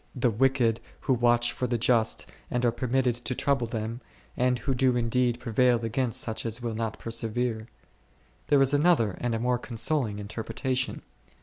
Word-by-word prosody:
the 125 -2 +1
wicked 120 -1 +2 0.2
who 130 - +1
watch 120 0 +3
for 125 - -2
the 120 0 0
just 115 -1 +1 0.2
and 125 0 0
are 120 - +4
permitted 125 +1 0
to 125 +1 -4
trouble 135 -4 0
them, 115 +2 -4 0.3
and 125 0 +2
who 135 +2 -2
do 125 -1 +2
indeed 120 +1 +1
prevail 120 0 +2
against 115 +1 0
such 110 -1 -2
as 115 0 -1
will 120 -2 -3
not 110 0 -3
persevere. 115 0 -2 0.8
There 145 -2 +5
is 135 +1 +1
another 145 - +3
and 120 -2 0
a - - -2
more 125 +1 +1
con 120 -2 -8
soling 115 -3 0
interpretation. 125 +5 -3
120 Hz, 175 wpm, -27 LUFS, 115-130 Hz, 0.8 s, There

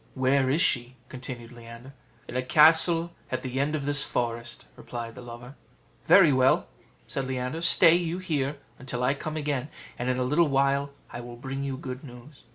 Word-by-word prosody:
"Where 130 0 +2
is 155 +6 +3
she?" 125 0 +1
continued 125 -2 -7
Leander. 120 +2 -12 0.3
"In - - -8
a 130 - +1
castle 165 +5 +5 0.2
at 130 0 -3
the 130 0 -3
end 145 +2 0
of 140 -3 -4
this 145 0 +2
forest," 120 -2 -4
replied 115 -1 -7
the 125 - -11
lover. 120 +2 -10 0.5
"Very 170 -8 +6
well," 130 0 +3 0.4
said 135 -1 -4
Leander; 130 +4 -3
"stay 170 0 +6
you 175 0 0
here 150 -6 -2 0.3
till 125 -1 -2
I 130 +2 +2
come 155 +2 -5
again, 145 -2 -2 0.3
and 125 +1 -2
in 125 - 0
a 130 - 0
little 150 +6 +2
while 140 0 +1 0.2
I 120 - -6
will 120 0 -9
bring 135 +3 -6
you 135 -1 -3
good 130 +1 -7
news." 125 +1 -14
135 Hz, 185 wpm, -26 LUFS, 125-150 Hz, 0.5 s, Very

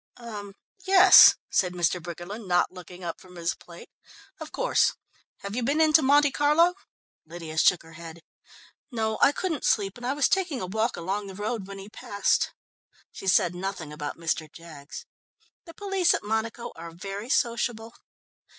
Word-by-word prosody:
"Er 210 -4 -8 0.3
yes," 385 0 +9 0.2
said 180 -2 +1
Mr. 175 0 0
Briggerland, 175 +6 -8
not 175 -1 +2
looking 180 0 -12
up 170 -1 -6
from 180 -1 -16
his 170 0 -2
plate, 170 -1 -14 0.5
"of - - -8
course. - - +1 0.5
Have 200 +1 -6
you 250 - -1
been 280 +6 0
into 315 0 +5
Monte 285 +1 +4
Carlo?" 300 +6 +3 0.5
Lydia 165 -1 -9
shook 180 - +4
her 160 0 -15
head. 165 0 -11 0.7
"No, 220 -4 -2
I - - +6
couldn't 320 -2 -3
sleep, 205 -2 0
and 245 - -9
I 265 - 0
was 285 -1 +2
taking 350 -8 0
a - - -4
walk 220 +5 -1
along 195 +4 -3
the 190 - -9
road 210 0 -4
when 195 0 -9
he 195 0 -10
passed." 200 -1 -1 0.6
She 195 - -9
said 180 -2 +3
nothing 180 -4 -5
about 150 -1 -6
Mr. 160 -2 -3
Jaggs. 155 -4 -11 0.6
"The 335 -2 -13
police 390 -3 +1
at - - -5
Monaco 220 +2 -3
are 165 +1 -9
very 195 +6 -7
sociable." 235 -2 -1
200 Hz, 170 wpm, -26 LUFS, 175-250 Hz, 0.7 s, yes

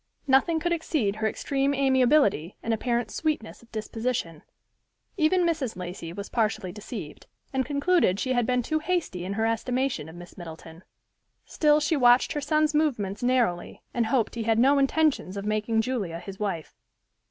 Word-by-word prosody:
Nothing 280 +5 +3
could 345 +2 -1
exceed 275 -11 -1
her 220 0 0
extreme 275 +4 0
amiability, 260 - +3
and 230 - 0
apparent 240 +1 -1
sweetness 305 -8 -3
of 235 - -21
disposition. 220 -6 -3 0.7
Even 360 0 +3
Mrs. 310 -8 -1
Lacey 175 -2 -6
was 200 +3 -6
partially 215 -5 -1
deceived, 205 - -8 0.3
and 265 -2 0
concluded 285 - +2
she 260 - 0
had 245 -2 +1
been 250 -1 +1
too 310 +5 0
hasty 315 - -2
in 195 - -3
her 220 +2 0
estimation 235 - -1
of 160 - -12
Miss 175 +2 -12
Middleton. 165 0 -10 0.6
Still 300 -1 +3
she 305 +2 +1
watched 245 -2 +4
her 295 - -2
son's 305 +1 +1
movements 235 -11 0
narrowly, 245 -8 0
and 235 -2 0
hoped 235 -1 +1
he 235 - -4
had 225 0 +1
no 275 +4 +5
intentions 275 - +1
of 200 - -4
making 215 +1 +1
Julia 220 -9 -3
his 190 +3 -9
wife. 190 -7 -3
240 Hz, 165 wpm, -26 LUFS, 200-280 Hz, 0.7 s, no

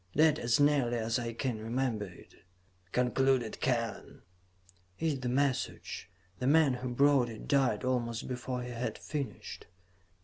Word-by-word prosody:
'" - - -28
"That, 155 0 +5
as 120 +2 +2
nearly 140 -5 +3
as 115 +1 0
I 115 -1 -3
can 115 -1 -2
remember 115 -1 -1
it," 90 -3 -14 0.6
concluded 125 -1 +1
Kellen, 115 -4 -2 0.7
"is 155 -4 0
the 125 -1 -2
message. 130 -7 -1 0.3
The 125 - -1
man 150 -2 +5
who 125 0 -4
brought 135 0 +4
it 110 -1 -9
died 130 -6 +2
almost 120 -2 -1
before 125 0 -3
he 125 - -6
had 120 +1 -3
finished. 145 -3 -5
125 Hz, 145 wpm, -31 LUFS, 115-135 Hz, 0.7 s, That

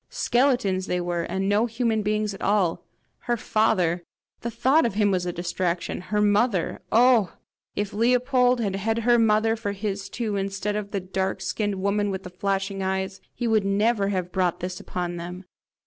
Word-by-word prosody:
Skeletons 245 - +1
they 180 - 0
were, 175 -1 -1
and 190 +3 -2
no 210 +4 +3
human 225 -1 0
beings 210 0 0
at 195 - -10
all! 195 -5 +1 0.4
Her 240 -1 -1
father! 180 -7 +1 0.4
the 235 - -4
thought 270 +7 +3
of 230 -5 -1
him 205 -1 +3
was 180 -2 0
distraction! 175 0 -2
Her 210 +3 -2
mother! 205 -2 +1
Oh, 235 -5 +4 0.4
if 205 0 -2
Leopold 250 +2 +3
had 200 -4 -1
had 220 +3 -1
her 240 0 +4
mother 225 0 +3
for 210 -3 -3
his 200 -1 -4
too, 220 -4 -2
instead 195 +1 -2
of 210 -1 -3
the 200 - -2
dark 190 +1 -2
skinned 205 -2 -2
woman 200 +2 0
with 190 -1 -4
the 180 - -9
flashing 195 +1 -2
eyes, 190 0 -2
he 240 - -2
would 220 -2 +3
never 200 +1 +2
have 185 -3 -2
brought 180 -2 0
this 180 +1 -4
upon 175 -1 -4
them! 180 +2 -7
200 Hz, 180 wpm, -25 LUFS, 190-225 Hz, 0.4 s, Oh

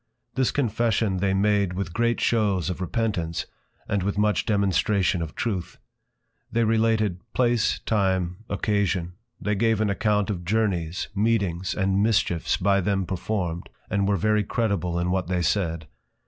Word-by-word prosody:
This 130 -2 +1
Confession 110 -5 0
they 95 +1 +1
made 100 -2 +2
with 90 -2 -4
great 120 +2 +1
Shews 100 -6 +1
of 90 - -6
Repentance, 90 -4 -1 0.4
and 100 - 0
with 100 +2 -2
much 105 0 +1
Demonstration 100 -2 +2
of 80 -2 -5
Truth. 100 -7 -3 0.7
They 115 0 +2
related 110 -4 +2
Place, 120 -3 +2
Time, 95 -4 +1
Occasion; 100 -3 0 0.3
they 105 - -1
gave 110 +1 +2
an 105 -2 +1
account 105 0 +1
of 90 -3 -4
Journeys, 90 -3 -1
Meetings 100 -4 0
and 95 0 +1
Mischiefs 100 -6 +1
by 100 +1 +2
them 95 0 0
performed, 90 -1 -3 0.2
and 100 -1 +1
were 100 -1 +2
very 105 +3 +2
credible 100 -6 -1
in 85 +1 0
what 95 -2 0
they 90 -1 0
said. 85 -4 0
100 Hz, 150 wpm, -25 LUFS, 90-110 Hz, 0.7 s, made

